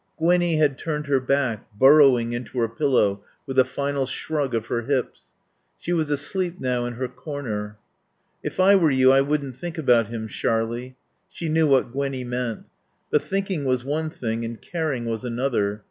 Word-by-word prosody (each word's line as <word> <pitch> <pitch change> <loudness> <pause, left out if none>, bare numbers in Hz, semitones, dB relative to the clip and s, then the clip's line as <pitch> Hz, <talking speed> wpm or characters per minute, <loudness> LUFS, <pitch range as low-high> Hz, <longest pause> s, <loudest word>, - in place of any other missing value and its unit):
Gwinnie 175 0 +2
had 145 -3 +2
turned 150 -2 -3
her 140 -2 +2
back, 130 -4 0
burrowing 130 -3 +6
into 120 +1 -6
her 115 -1 +2
pillow 115 -5 +1 0.2
with 135 0 0
a - - +8
final 140 +1 -2
shrug 145 -3 -2
of 110 -1 -1
her 120 0 -2
hips. 130 0 -2 0.5
She 175 - -3
was 160 -3 0
asleep 175 +5 -1
now 125 -1 -1
in 120 - -4
her 130 +2 -3
corner. 115 -7 -6 0.6
"If - - -6
I 195 +2 +6
were 170 -5 +4
you 130 -1 +5
I 135 0 +5
wouldn't 140 -2 -1
think 175 -1 -6
about 120 -7 +3
him, 115 -1 -5
Sharlie" 115 +4 -2 0.3
She 165 - -5
knew 160 0 +3
what 135 -4 +3
Gwinnie 135 -1 -2
meant. 125 -2 -3 0.5
But 150 - +3
thinking 195 -5 -2
was 130 -2 0
one 155 +3 -1
thing 115 -7 -3
and 115 0 -5
caring 155 -8 -3
was 115 0 -3
another. 115 -4 -1
130 Hz, 175 wpm, -24 LUFS, 120-150 Hz, 0.6 s, a